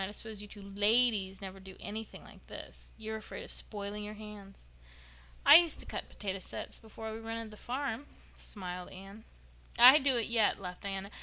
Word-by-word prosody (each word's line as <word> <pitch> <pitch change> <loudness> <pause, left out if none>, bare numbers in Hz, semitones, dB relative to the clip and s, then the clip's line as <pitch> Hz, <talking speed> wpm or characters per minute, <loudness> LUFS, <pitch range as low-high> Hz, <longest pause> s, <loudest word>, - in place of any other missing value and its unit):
I 190 +1 -3
suppose 220 -1 -4
you 210 - -9
two 205 -1 -10
ladies 205 -1 +2
never 195 0 -7
do 190 0 -12
anything 215 +1 -7
like - - -16
this. - - -10
You'd 220 -1 -6
be 220 - -2
afraid 215 - -8
of - - -7
spoiling 205 0 -2
your 210 +1 -6
hands." 210 -2 -11 0.8
"I - - +12
used 340 -2 +3
to - - -5
cut - - -5
potato 195 -1 -4
sets - - -6
before 220 0 -8
we 220 - -6
rented 225 0 -5
the - - -10
farm," 270 +2 -3 0.3
smiled 180 -3 -5
Anne. 195 +3 -11 0.5
"I 255 +5 +10
do 270 -3 +4
it 230 - +1
yet," 225 -3 +2
laughed 180 -2 -7
Diana. 195 0 -5
210 Hz, 190 wpm, -32 LUFS, 195-225 Hz, 0.8 s, I